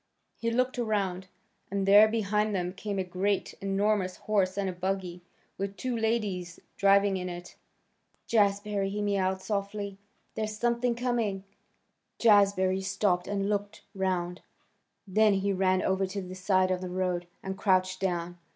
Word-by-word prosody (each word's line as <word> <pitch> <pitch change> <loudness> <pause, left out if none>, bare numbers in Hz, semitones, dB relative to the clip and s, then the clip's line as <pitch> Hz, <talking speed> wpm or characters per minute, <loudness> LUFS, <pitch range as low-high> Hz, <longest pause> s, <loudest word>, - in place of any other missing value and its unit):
He 230 - -2
looked 250 +2 0
around, 195 -5 -1 0.4
and 195 0 -1
there 205 +2 +8
behind 210 -1 0
them 180 -1 -2
came 200 +1 -4
a 190 - 0
great, 185 +2 -1
enormous 195 -1 0
horse 195 -3 0
and 200 -1 0
a 185 - -2
buggy, 180 -1 -3 0.4
with 195 0 -3
two 255 -2 -2
ladies 210 -6 -1 0.2
driving 200 0 +4
in 180 0 -4
it. 175 0 -8 0.7
"Jazbury," 205 -2 +1
he 205 +1 -4
mewed 190 -2 0
softly, 200 -1 -3 0.3
"there's 215 -1 -3
something 235 +1 +1
coming." 230 -6 -1 0.7
Jazbury 200 -3 +4
stopped 185 -2 0
and 200 -1 -1
looked 205 0 -3
round. 185 -2 -2 0.7
Then 210 +1 +4
he 195 +1 0
ran 185 0 +2
over 190 0 +1
to 195 +1 -4
the 185 0 -8
side 185 0 +2
of 185 0 -1
the 185 - -4
road, 180 -1 -1 0.2
and 190 0 -4
crouched 185 -1 +1
down. 175 -2 -2
195 Hz, 150 wpm, -29 LUFS, 185-210 Hz, 0.7 s, there